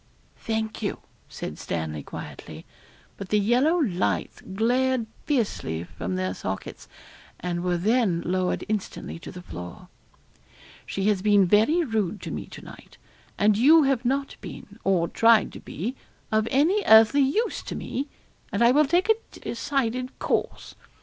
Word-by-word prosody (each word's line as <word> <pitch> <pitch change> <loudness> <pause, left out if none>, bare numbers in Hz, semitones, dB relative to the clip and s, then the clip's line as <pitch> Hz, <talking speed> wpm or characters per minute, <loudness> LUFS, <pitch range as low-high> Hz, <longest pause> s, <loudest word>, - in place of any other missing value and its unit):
'Thank 220 -1 -3
you,' 205 - -2 0.3
said - - -7
Stanley 80 -2 -3
quietly, - - -9 0.5
but 195 -2 -7
the 210 - +3
yellow 245 - +3
lights 200 - -1
glared 245 +5 +1 0.2
fiercely 205 - -1
from 90 +1 -5
their 95 0 -1
sockets, 95 0 -6 0.5
and 175 -1 -3
were 180 -1 +1
then 200 -2 +1
lowered 185 +1 0
instantly 210 -5 -4
to - - -9
the 180 -1 -10
floor. 90 - -9 1.0
'She 195 +1 -1
has 205 -3 +2
been 205 -1 +5
very 220 - +4
rude 215 - -1
to - - -5
me - - -5
to - - -11
night; - - -13 0.4
and 210 0 +3
you 310 +6 +7
have 270 -3 +1
not 275 +3 -1
been, - - -10
or 180 -3 +2
tried 225 +1 +4
to - - -8
be, 225 - -5 0.4
of 215 0 +2
any 320 +10 +3
earthly 220 +6 +7
use 415 - +1
to - - -6
me; 275 +3 -4 0.4
and - - +1
I 235 - +6
will 300 +3 +5
take 350 +7 +2
a 445 +1 -1
decided 255 0 -2
course. - - -2
220 Hz, 150 wpm, -25 LUFS, 185-260 Hz, 1.0 s, you